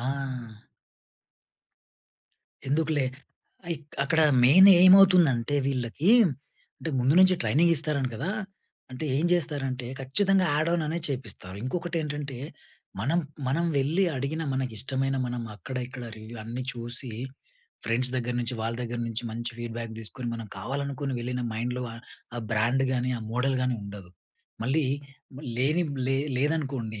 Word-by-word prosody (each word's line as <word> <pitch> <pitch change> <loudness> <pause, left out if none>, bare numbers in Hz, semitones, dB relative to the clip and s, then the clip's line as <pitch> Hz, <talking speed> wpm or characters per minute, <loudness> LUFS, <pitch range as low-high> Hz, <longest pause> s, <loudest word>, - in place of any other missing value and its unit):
ఆ! - - -6 2.7
ఎందుకులే 150 -1 +1 0.7
ఇక్ 150 0 -15
అక్కడ 160 +3 +2 0.2
మెయినేమవుతుంది 185 +2 +8
అంటే 120 +4 -2
వీళ్ళకీ 135 - 0 0.7
అంటే 165 - -4
ముందు 130 +4 +3
నుంచి 185 0 +6
ట్రైనింగ్ 170 +4 +3
ఇస్తారు 150 0 0
అంటా 130 -2 -1
కదా! 150 +11 -2 0.6
అంటే 130 +4 -5
ఏం 155 - +1
చేస్తారంటే 140 -7 -1
ఖచ్చితంగా 190 +8 +2
యాడ్ 155 +2 +1
ఆన్ 165 - 0 0.2
చేపిస్తారు. 125 -8 -5
ఇంకొకటేంటంటే, 150 -3 -3 0.6
మనం, 145 +10 +1 0.3
మనం 160 +6 +1
వెళ్లి 155 +8 +2
అడిగిన 140 +5 -2
మనకిష్టమైన 130 +2 -1
మనం 120 -1 -3
అక్కడ 130 +5 -7
ఇక్కడ 125 -1 -8
రివ్యూ 110 +2 -10
అన్ని 120 +3 -4
చూసి 120 +1 -4 0.7
ఫ్రెండ్స్ 125 +2 +3
దగ్గర 125 0 -2
నుంచి 120 +1 -2
వాళ్ళ 115 +1 -2
దగ్గర 120 0 -4
నుంచి 115 0 -4
మంచి 115 +1 -4
ఫీడ్‌బ్యాక్ 115 -1 -5
తీసుకొని 120 +3 -4
మనం 115 -1 -6
కావాలనుకుని 140 +1 -3
వెళ్ళిన 125 +1 -3
మైండ్‌లో 125 +3 -2 0.5
ఆ - - -2
బ్రాండ్ 120 +5 +2
గానీ, 125 0 0
ఆ - - -9
మోడల్‌ 130 +2 +1
గాని 125 -1 +1
ఉండదు. 100 -3 -9 0.5
మళ్ళీ 140 +6 +1 0.7
లేనివి 150 +6 +1 0.2
లే 135 - +2 0.2
లేదనుకోండి 135 -6 -1
130 Hz, 125 wpm, -27 LUFS, 120-155 Hz, 2.7 s, మెయినేమవుతుంది